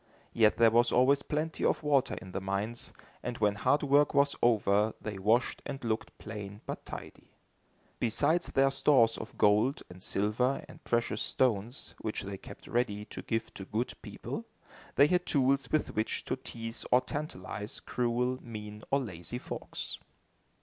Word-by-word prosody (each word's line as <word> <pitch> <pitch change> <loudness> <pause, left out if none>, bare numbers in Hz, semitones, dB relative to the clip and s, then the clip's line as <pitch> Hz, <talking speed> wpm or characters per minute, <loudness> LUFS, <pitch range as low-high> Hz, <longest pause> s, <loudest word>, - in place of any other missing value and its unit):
Yet 110 -2 +4
there 115 -1 +6
was 120 +2 +4
always 135 +3 +5
plenty 155 +2 -2
of - - +2
water 140 -3 +2
in 95 -4 -10
the 95 - -3
mines, 100 +5 -2 0.3
and 125 -1 -4
when 105 -1 +3
hard 125 +9 +2
work 145 +1 +4
was 140 0 +4
over 105 -2 +3
they 105 -3 -5
washed 110 +6 +2
and 135 -2 -6
looked 110 -1 -2
plain 105 -1 -7
but - - -6
tidy. - - -9 0.7
Besides 145 +9 +2
their 135 0 +3
stores 130 -5 +4
of - - -8
gold, 105 +7 +3
and 90 +1 -12
silver, 110 +8 0
and - - -14
precious 120 0 0
stones, 120 -1 0
which 110 - -3
they 100 -1 -6
kept - - -12
ready, 105 -4 0
to - - -8
give 115 0 -2
to 95 - -7
good 110 +5 -2
people, - - -6 0.5
they 140 - +7
had 180 +3 +2
tools 135 -2 +2
with 155 - +1
which 110 +1 -1
to - - -1
tease 115 -3 -6
or 125 - +6
tantalize 110 -9 -5
cruel, 125 +1 0
mean 105 -2 -8
or 140 - +3
lazy 95 0 -6
folks. - - -5
120 Hz, 165 wpm, -31 LUFS, 105-135 Hz, 0.7 s, they